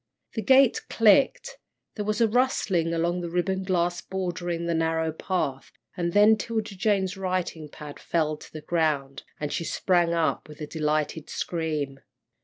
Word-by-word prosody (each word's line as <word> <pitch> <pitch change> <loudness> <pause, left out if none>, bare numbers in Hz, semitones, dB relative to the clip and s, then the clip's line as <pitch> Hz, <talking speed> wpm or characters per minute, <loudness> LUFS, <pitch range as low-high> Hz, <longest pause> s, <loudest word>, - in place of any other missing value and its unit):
The 220 - -2
gate 265 +3 +5
clicked, 230 +5 +3 0.4
there 210 - -3
was 215 0 -1
a 230 - +6
rustling 210 -8 +1
along 170 +2 0
the 170 - -4
ribbon 190 +2 0
grass 175 -2 0
bordering 175 -2 -3
the 170 - 0
narrow 160 0 0
path, 155 -5 -3 0.2
and 170 -2 -1
then 210 +3 +6
'Tilda 220 -1 -3
Jane's 190 -1 0
writing 180 -5 -3
pad 150 0 -10
fell 155 -2 0
to - - -14
the 155 - -8
ground, 150 -5 0 0.2
and 150 -1 -3
she - - -1
sprang 175 +1 +1
up 165 -2 0
with 150 - -12
a 150 - -4
delighted 155 0 -1
scream. 155 -5 -3
170 Hz, 160 wpm, -26 LUFS, 160-190 Hz, 0.4 s, a